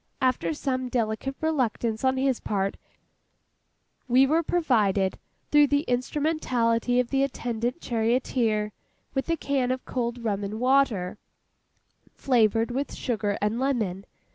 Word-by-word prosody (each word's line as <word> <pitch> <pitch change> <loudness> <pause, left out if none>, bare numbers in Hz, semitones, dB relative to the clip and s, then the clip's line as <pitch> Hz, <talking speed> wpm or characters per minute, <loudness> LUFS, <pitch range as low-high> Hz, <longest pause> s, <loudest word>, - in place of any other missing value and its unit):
After 255 +3 +1
some 260 -4 -2
delicate 235 +3 -1
reluctance 245 -7 0
on 260 0 +2
his 265 -2 +1
part, 195 -1 -1 1.3
we 255 +2 +5
were 315 +4 +2
provided, 215 - +1 0.3
through 295 -1 +6
the 285 +1 +1
instrumentality 250 -3 0
of 250 -1 -1
the 270 -1 +2
attendant 245 0 -2
charioteer, 225 -2 0 0.4
with 270 +3 -2
a 330 - +1
can 275 -4 0
of 255 0 -2
cold 240 -1 -3
rum 205 -3 -1
and 210 +2 -4
water, 250 -8 +2 1.0
flavoured 230 -2 +2
with 275 +3 -3
sugar 210 -5 -1
and 215 +3 0
lemon. 215 -8 -1
245 Hz, 125 wpm, -26 LUFS, 220-270 Hz, 1.3 s, through